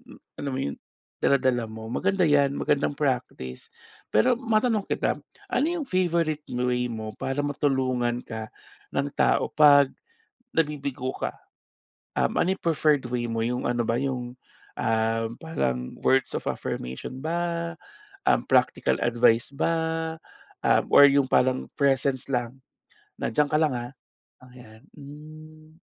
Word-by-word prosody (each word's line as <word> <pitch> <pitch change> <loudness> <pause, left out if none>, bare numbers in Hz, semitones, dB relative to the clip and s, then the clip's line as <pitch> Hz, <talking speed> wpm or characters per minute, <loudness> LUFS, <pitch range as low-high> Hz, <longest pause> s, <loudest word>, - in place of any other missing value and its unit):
m - - -17 0.2
alam 140 - -3
mo - - -2
yun, - - -8 0.5
dala-dala 130 -3 +2
mo. 110 0 -8
Maganda 185 - +1
'yan, 145 -2 +4
magandang 145 0 0
practice. 120 - -3 0.4
Pero 110 - +4
matanong 225 -3 +1
kita, - - -1 0.3
ano 275 -6 +1
yung 315 -6 -3
favorite 170 -4 0
m 125 0 -1
way 125 0 0
mo 110 -1 -6
para 135 +1 -3
matulungan 130 -4 0
ka 110 -2 -7 0.4
ng 140 +1 0
tao - - +2
pag 145 -2 +6 0.7
nabibigo 140 -5 -1
ka? - - -3 0.8
Um, - - +1
ano 190 +2 +2
yung - - -25
preferred 155 -3 +2
way 120 -1 -1
mo? 115 0 -1
Yung 125 +2 -1
ano 120 -1 0
ba 115 +2 0
yung, 125 -2 -4 0.4
ah, 115 0 +1 0.2
parang 65 - -2
words 135 0 +2
of - - -7
affirmation 65 - -4
ba, 170 +2 -2 0.6
um, - - +2
practical - - +2
advice 120 0 +3
ba, 160 +2 -1 0.5
um, - - +4
or - - +9
yung 140 -1 +3
parang 130 0 +2
presence 135 -2 +1
lang 120 +1 -2 0.6
na, - - -1
"Diyan 150 +6 +2
ka 150 - +3
lang, 155 -3 +2
ah." 120 +1 -7 0.5
oh, 130 - -15
yan. 110 -3 -15 0.2
Hmm. 155 +2 -13
135 Hz, 140 wpm, -26 LUFS, 120-155 Hz, 0.8 s, or